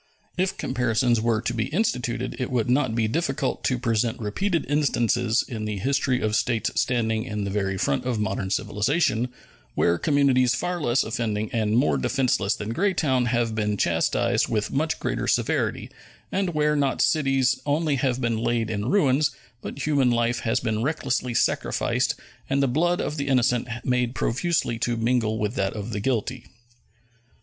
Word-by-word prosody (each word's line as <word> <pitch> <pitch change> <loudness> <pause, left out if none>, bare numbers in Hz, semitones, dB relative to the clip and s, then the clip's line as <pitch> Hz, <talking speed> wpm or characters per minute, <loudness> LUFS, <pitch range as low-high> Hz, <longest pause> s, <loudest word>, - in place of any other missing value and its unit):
If 185 +1 -1
comparisons 120 -2 +1
were 115 -1 +1
to 120 - -1
be 115 -1 -1
instituted, 125 - -1
it 125 - -2
would 125 -2 0
not 130 -3 +2
be 115 -2 +1
difficult 135 0 -1
to 125 - +1
present 115 -2 0
repeated 165 - -1
instances 125 -5 +1
in 110 -3 -5
the 105 -1 -3
history 130 +3 0
of 110 0 0
states 115 -2 0
standing 110 -3 0
in 105 -2 -4
the 100 - -3
very 95 -1 -1
front 70 -6 0
of 125 -3 -1
modern 100 -2 -2
civilization 110 - 0 0.4
where 85 0 +2
communities 135 -4 +3
far 175 0 -2
less 120 -2 +2
offending 110 -2 -2
and 110 -1 +1
more 75 - +2
defenseless 110 - +1
than 105 +2 -5
Greytown 150 -9 +1
have 120 -1 0
been 105 -1 -1
chastised 85 -3 +1
with 105 -2 -1
much 155 +3 -1
greater - - -2
severity, - - 0 0.4
and 185 -3 -1
where 150 0 +2
not 140 -2 0
cities 135 -4 +2
only 145 0 +1
have 130 -2 0
been 115 -3 0
laid 115 -1 0
in 105 +1 -2
ruins, 150 -6 +3 0.3
but 140 - -5
human 140 -4 +3
life 120 0 +1
has 115 +2 0
been 110 -2 -1
recklessly 130 -3 -1
sacrificed - - +1 0.3
and 140 +1 +2
the - - +3
blood 175 +7 +1
of 150 - -2
the 140 -1 -2
innocent 125 -2 +2 0.2
made 125 -1 0
profusely 125 -3 0
to 120 0 0
mingle 115 -1 +1
with 105 0 -1
that 100 -6 -1
of 105 +1 -5
the 105 - -2
guilty. 125 +2 -2
120 Hz, 170 wpm, -24 LUFS, 110-140 Hz, 0.4 s, communities